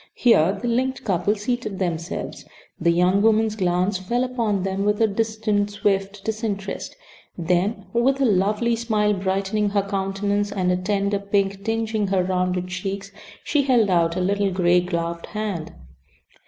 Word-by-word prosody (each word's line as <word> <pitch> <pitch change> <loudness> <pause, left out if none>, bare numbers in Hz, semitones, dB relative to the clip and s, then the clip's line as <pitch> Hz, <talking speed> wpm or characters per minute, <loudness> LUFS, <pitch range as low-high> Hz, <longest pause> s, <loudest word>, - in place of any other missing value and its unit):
Here 200 -5 +4
the 240 - -3
linked 260 +2 0
couple 200 0 +1
seated 215 -1 -3
themselves. 170 -2 -3 0.4
The 170 - +2
young 180 +3 +3
woman's 220 0 +3
glance 185 0 0
fell 235 +7 -1
upon 230 -7 -1
them 195 +1 -1
with 210 0 +1
a 225 - +5
distant, 215 -1 0
swift 195 -1 -1
disinterest; 210 -3 -3 0.4
then 185 +4 0
with 260 +4 +2
a 270 - +3
lovely 210 +3 +2
smile 215 -2 +1
brightening 195 +2 0
her 200 0 +1
countenance 200 +1 -1
and 185 -3 0
a - - +2
tender 200 +2 0
pink 200 -1 -1
tingeing 225 -1 -1
her 190 -2 +2
rounded 180 0 -1
cheeks, 195 +2 -4 0.3
she 295 - +2
held 245 -7 +3
out 170 -1 +2
a 185 - -1
little 200 +2 +1
gray 180 -1 +3
gloved 170 -1 -3
hand. 210 -7 -4
200 Hz, 155 wpm, -23 LUFS, 185-215 Hz, 0.4 s, a